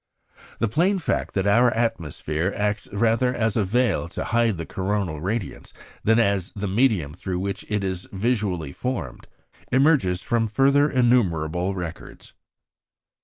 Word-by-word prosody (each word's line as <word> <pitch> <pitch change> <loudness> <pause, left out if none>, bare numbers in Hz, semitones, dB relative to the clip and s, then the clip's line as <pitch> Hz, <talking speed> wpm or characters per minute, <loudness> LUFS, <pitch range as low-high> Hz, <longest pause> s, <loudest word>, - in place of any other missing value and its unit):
The 115 - +1
plain 175 - +2
fact, 175 - -2
that 95 -1 +1
our 120 +5 +5
atmosphere 90 - -2
acts 105 0 -1
rather 115 +4 +1
as 110 -2 0
a 110 - +2
veil 115 -3 +1
to - - -4
hide 115 0 +1
the 85 - -5
coronal 95 -5 -2
radiance 100 +3 -4 0.3
than 115 +1 +4
as 100 -6 +1
the 100 0 -3
medium 95 - +1
through 90 +2 -4
which 100 +1 -3
it 105 -1 -1
is 95 -1 -3
visually 95 - -1
formed, 90 - -5 0.4
emerges 130 - +3
from 115 -1 +1
further 140 +6 +3
innumerable 95 - +1
records. 85 -3 -8
105 Hz, 140 wpm, -24 LUFS, 90-120 Hz, 0.4 s, our